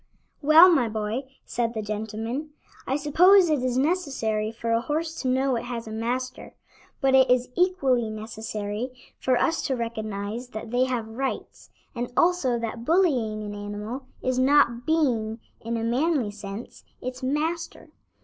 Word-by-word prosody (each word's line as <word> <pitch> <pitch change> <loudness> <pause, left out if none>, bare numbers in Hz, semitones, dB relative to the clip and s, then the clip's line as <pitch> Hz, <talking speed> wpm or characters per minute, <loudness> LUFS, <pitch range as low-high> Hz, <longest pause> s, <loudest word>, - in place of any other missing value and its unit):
"Well, 310 +4 +8
my 245 -7 +2
boy," 220 +5 -3 0.2
said 230 -1 -2
the 220 - -2
gentleman, 220 +7 -4 0.3
"I 265 - +1
suppose 345 +5 +5
it 295 -4 +2
is 255 -1 0
necessary 265 -9 0
for 230 0 -4
a 230 0 +3
horse 315 +5 -2
to 260 - -2
know 260 +1 +2
it 230 - -5
has 235 -2 -5
a - - -6
master, 245 +3 -4 0.5
but 270 -1 +3
it 265 -1 +6
is 250 0 +3
equally 275 -11 +2
necessary 215 +1 -5 0.3
for 255 -1 +2
us 325 +6 +1
to 265 - 0
recognize 220 0 -4
that 220 -1 -7
they 250 +1 +3
have 245 -4 -2
rights, 260 +5 -5 0.2
and 240 0 -4
also 335 -9 +3
that 230 0 -4
bullying 250 - +2
an 205 0 -5
animal 210 +5 -6 0.2
is 255 0 0
not 255 -3 +3
being, 240 -9 +1 0.2
in 230 +1 -3
a 225 - -2
manly 255 0 +1
sense, 205 +2 -8 0.2
its 255 +1 -6
master. 305 +6 -2
245 Hz, 160 wpm, -25 LUFS, 220-275 Hz, 0.5 s, Well